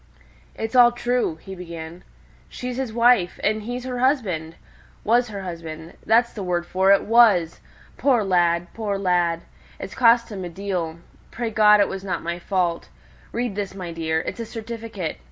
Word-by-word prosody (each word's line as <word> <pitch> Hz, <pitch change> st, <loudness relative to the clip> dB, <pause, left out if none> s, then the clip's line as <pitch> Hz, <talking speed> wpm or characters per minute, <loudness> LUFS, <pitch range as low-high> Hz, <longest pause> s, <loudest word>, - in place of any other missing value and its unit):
"It's 225 Hz, +3 st, -4 dB
all 240 Hz, -1 st, +7 dB
true," 245 Hz, -6 st, -1 dB
he 190 Hz, +4 st, -10 dB
began; 170 Hz, -1 st, -8 dB, 0.5 s
"she's 250 Hz, 0 st, -5 dB
his 260 Hz, -4 st, -2 dB
wife, 230 Hz, -5 st, +3 dB
and 215 Hz, +1 st, +1 dB
he's 245 Hz, +3 st, -5 dB
her 250 Hz, -1 st, -4 dB
husband 195 Hz, -, 0 dB, 0.5 s
was 240 Hz, +3 st, +3 dB
her 200 Hz, -3 st, -7 dB
husband 165 Hz, -2 st, -8 dB
that's 235 Hz, +2 st, +3 dB
the 210 Hz, -, -6 dB
word 175 Hz, -2 st, -1 dB
for 190 Hz, +2 st, +2 dB
it 200 Hz, -, +5 dB
was! 210 Hz, -8 st, +4 dB, 0.4 s
Poor 255 Hz, -6 st, +3 dB
lad! 175 Hz, -2 st, +2 dB
poor 210 Hz, -3 st, -2 dB
lad! 175 Hz, -3 st, +1 dB, 0.4 s
it's -, -, -7 dB
cost 235 Hz, -1 st, +4 dB
him 195 Hz, -3 st, -5 dB
a 175 Hz, -, -5 dB
deal. 175 Hz, -3 st, -3 dB, 0.3 s
Pray 235 Hz, -2 st, -4 dB
God, 210 Hz, -1 st, +6 dB
it 200 Hz, -, +3 dB
wasn't 195 Hz, -1 st, -4 dB
my 170 Hz, +1 st, -3 dB
fault. 175 Hz, -2 st, -1 dB, 0.4 s
Read 240 Hz, -2 st, -2 dB
this, 200 Hz, -2 st, -4 dB
my 180 Hz, -3 st, -6 dB
dear. 160 Hz, -1 st, -1 dB
It's -, -, -6 dB
a 230 Hz, -, -3 dB
certificate. 225 Hz, -, -6 dB
200 Hz, 170 wpm, -23 LUFS, 175-235 Hz, 0.5 s, all